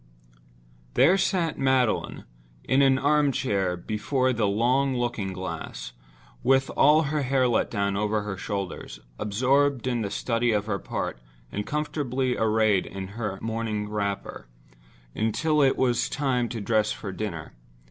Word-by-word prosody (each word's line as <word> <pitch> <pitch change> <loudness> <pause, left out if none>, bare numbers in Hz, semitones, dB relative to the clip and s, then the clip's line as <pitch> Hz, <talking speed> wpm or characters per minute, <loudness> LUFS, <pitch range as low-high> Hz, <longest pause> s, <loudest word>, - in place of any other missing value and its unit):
There 160 +8 +6
sat 185 -4 0
Magdalen, 130 -4 +1 0.4
in 135 +2 +2
an 135 -1 +5
arm 145 +1 +3
chair 95 -8 0
before 130 +7 0
the 110 -3 +1
long 125 +6 +2
looking 115 -5 -2
glass, 95 -9 -6 0.5
with 135 +1 +3
all 150 +3 +5
her 150 0 -1
hair 130 -1 +2
let 120 - +1
down 100 -2 -1
over 105 +1 0
her 105 -2 -4
shoulders; 95 - -5 0.2
absorbed 130 +5 +1
in 120 -2 0
the 100 - -2
study 115 +3 0
of 105 -1 0
her 100 -3 -2
part - - -4 0.3
and 105 0 -4
comfortably 135 -4 -1
arrayed 110 -3 +2
in 95 -1 -6
her 105 -2 -4
morning 110 -2 -2
wrapper, 100 - -3 0.7
until 150 +8 +1
it 135 -1 +3
was 120 -2 +1
time 125 -4 0
to 115 - -4
dress 110 +1 +1
for 100 - -5
dinner. 95 -6 -5
115 Hz, 145 wpm, -26 LUFS, 105-135 Hz, 0.7 s, There